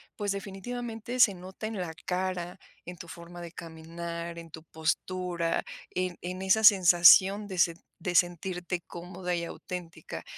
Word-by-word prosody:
pues, 205 -2 -2
definitivamente 225 +4 -5
se 215 -5 +7
nota 190 +4 -7
en 220 -2 -5
la 165 -3 -4
cara, 180 -1 -2 0.3
en 180 - -7
tu 170 - -10
forma 170 +1 -10
de 170 -1 -8
caminar, 170 +1 -7
en 165 -1 -11
tu 160 +1 -10
postura, 170 +2 -1 0.3
en 180 -1 -2
en 180 +1 -5
esa 190 +3 +3
sensación 190 +1 +7
de 190 -2 -6
se 170 -1 +4 0.3
de 180 +1 -3
sentirte 175 0 0
cómoda 180 +1 -5
y 170 - -2
auténtica. 175 -1 -7
180 Hz, 150 wpm, -29 LUFS, 170-190 Hz, 0.3 s, se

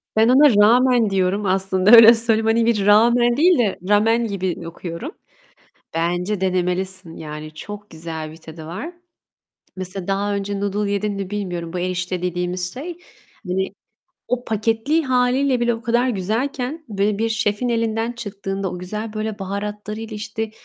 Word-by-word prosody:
Ben 220 +2 +4
ona 270 -2 +6
ramen 245 -1 +4
diyorum 195 +2 0
aslında, 190 +1 +2
öyle 230 0 +10
söyleyeyim. 225 -1 +1
Hani, 225 +1 +3
bir 210 -4 +1
rağmen 240 +3 +4
değil 345 +2 +5
de 210 -5 0
ramen 225 +3 +3
gibi 190 -4 -3
okuyorum. 175 - -7 0.8
Bence 175 +4 -1
denemelisin, 185 -1 -1
yani, 155 0 -8
çok 205 +6 -9
güzel 160 -1 -7
bir 160 - -12
tadı 160 -1 -11
var. 260 - -6 0.8
Mesela 185 0 -6
daha 200 +1 0
önce 200 0 -3
noodle 205 0 -1
yedin 205 +1 -1
mi 195 -1 -5
bilmiyorum, 180 -5 -4
bu 180 - -2
erişte 180 0 -2
dediğimiz 180 0 -2
şey, 330 +6 -7 0.5
hani, 190 +2 -1 0.5
o 245 0 -1
paketli 225 +9 0
hâliyle 255 0 +2
bile 240 0 +2
o 225 - -6
kadar 240 +3 +1
güzelken, 250 - -2
böyle 200 0 0
bir 225 +1 0
şefin 220 +2 0
elinden 230 0 0
çıktığında, 195 -4 -5
o 180 - -6
güzel 210 +4 -5
böyle 215 -1 -4
baharatlarıyla, 210 +3 -5
işte, 215 +1 -4
205 Hz, 150 wpm, -21 LUFS, 185-230 Hz, 0.8 s, öyle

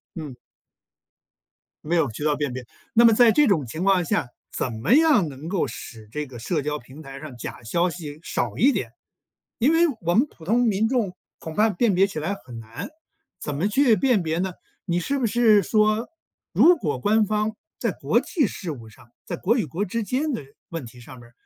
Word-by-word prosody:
嗯。 145 -7 -7 1.5
没 170 +3 0
有 155 -7 +2
渠 145 - -7
道 150 -1 +2
辨 145 -4 -2
别。 125 -1 -6 0.3
那 235 +1 +6
么 230 - +7
在 230 0 +6
这 295 +2 +4
种 165 - +2
情 155 +9 -5
况 190 -2 +3
下， 140 - 0 0.2
怎 125 - -2
么 110 - +1
样 295 - +5
能 140 +3 -9
够 180 -6 0
使 110 -2 -9
这 150 +4 -3
个 130 -3 -11
社 150 +7 -1
交 150 +1 -3
平 130 +6 -13
台 135 -2 -9
上 150 -4 -9
假 - - -7
消 170 +10 +1
息 155 -4 -8
少 - - -2
一 275 +4 +5
点。 - - -3 0.7
因 270 +7 +4
为 335 +1 +5
我 170 +1 +1
们 245 +10 +4
普 160 - -16
通 235 +5 +3
民 220 -1 +2
众 220 -8 -1 0.2
恐 160 -2 -8
怕 215 +1 +4
辨 205 0 +1
别 195 - +5
起 190 - -5
来 165 +6 -2
很 120 -9 -11
难， 115 +1 -8 0.5
怎 150 - -4
么 170 +8 0
去 235 +1 +4
辨 235 -2 +2
别 160 +1 -1
呢？ 190 0 -2 0.3
你 175 -1 0
是 280 +10 -1
不 250 - +1
是 220 -2 +4
说 215 +3 +2 0.5
如 350 -1 +6
果 145 - -2
官 215 +7 +3
方 215 +1 -1 0.2
在 - - 0
国 - - +1
际 300 - 0
事 180 -5 -6
务 115 -6 -9
上， 110 +1 -19 0.2
在 - - -4
国 230 +7 +1
与 220 - 0
国 170 +8 -3
之 230 +4 -2
间 270 +9 -1
的 235 - -3 0.3
问 165 -5 -5
题 120 +1 -13
上 125 +1 -12
面 120 0 -16
180 Hz, 230 characters per minute, -24 LUFS, 145-225 Hz, 1.5 s, 么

